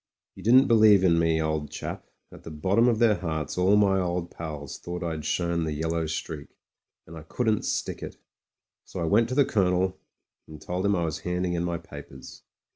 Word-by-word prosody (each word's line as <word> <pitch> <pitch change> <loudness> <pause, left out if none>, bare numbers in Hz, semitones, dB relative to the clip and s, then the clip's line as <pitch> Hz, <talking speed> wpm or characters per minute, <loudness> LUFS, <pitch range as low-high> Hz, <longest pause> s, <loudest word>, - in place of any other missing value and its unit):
You - - -13
didn't 130 +5 +6
believe 110 -5 +5
in 85 -3 +4
me, 80 -1 +2
old 80 -2 -2
chap; - - -7 0.2
at - - -13
the - - -9
bot 80 +6 -1
tom 115 +1 +5
of 120 -3 +2
their 110 -3 +3
hearts 80 -4 -4
all 90 +3 +3
my 100 -2 +3
old 90 -1 -2
pals 75 -4 -7
thought 90 +1 -6
I'd 80 -3 -4
shown 85 -1 0
the 80 -1 -2
yellow 80 +1 -2
streak; 75 -1 -5 0.6
and 85 - -12
I 80 - -8
couldn't 110 +7 -1
stick - - -3
it. - - -8 0.7
So - - -8
I - - -1
went 110 +7 +3
to 130 - -3
the 140 -1 +4
Colonel, 95 -3 +1 0.5
and 75 -1 -11
told 90 +5 -2
him 100 - +2
I 85 -2 0
was 80 -1 -3
handing 90 0 -2
in 85 0 -1
my 85 -1 -2
papers. 75 -4 -12
85 Hz, 205 wpm, -26 LUFS, 80-100 Hz, 0.7 s, didn't